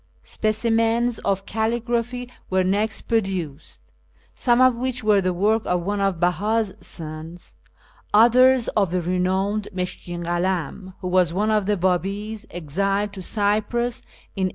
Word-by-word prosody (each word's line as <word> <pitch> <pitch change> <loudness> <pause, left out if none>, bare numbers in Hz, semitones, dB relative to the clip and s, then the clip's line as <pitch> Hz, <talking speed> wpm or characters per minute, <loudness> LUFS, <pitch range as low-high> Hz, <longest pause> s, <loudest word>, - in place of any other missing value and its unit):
Specimens 225 +2 +1
of 195 -1 -1
calligraphy 235 +2 -1 0.2
were 185 0 +2
next 205 +3 0
produced, 185 -10 -3 0.5
some 240 -1 +2
of 255 0 +6
which 250 0 -3
were 210 -2 +4
the 185 -1 0
work 210 +5 +2
of 180 -1 0
one 205 +2 -1
of 195 -1 +1
Beh; 175 +1 0
i's 215 -1 +1
sons, 160 +1 -8 0.6
others 245 +3 +5
of 200 -4 +1
the 180 0 -1
renowned 190 +4 0
Mushkin 180 -2 -5
Kalam, 180 +1 -2
who 180 - -3
was 180 -2 +2
one 210 +3 +1
of 210 -3 +1
the 210 -1 +2
Babis 200 +5 -1
exiled 195 +5 -1
to 195 - -7
Cyprus 215 +5 0 0.3
in 190 -2 +1
A. - - -2
200 Hz, 145 wpm, -23 LUFS, 180-225 Hz, 0.6 s, of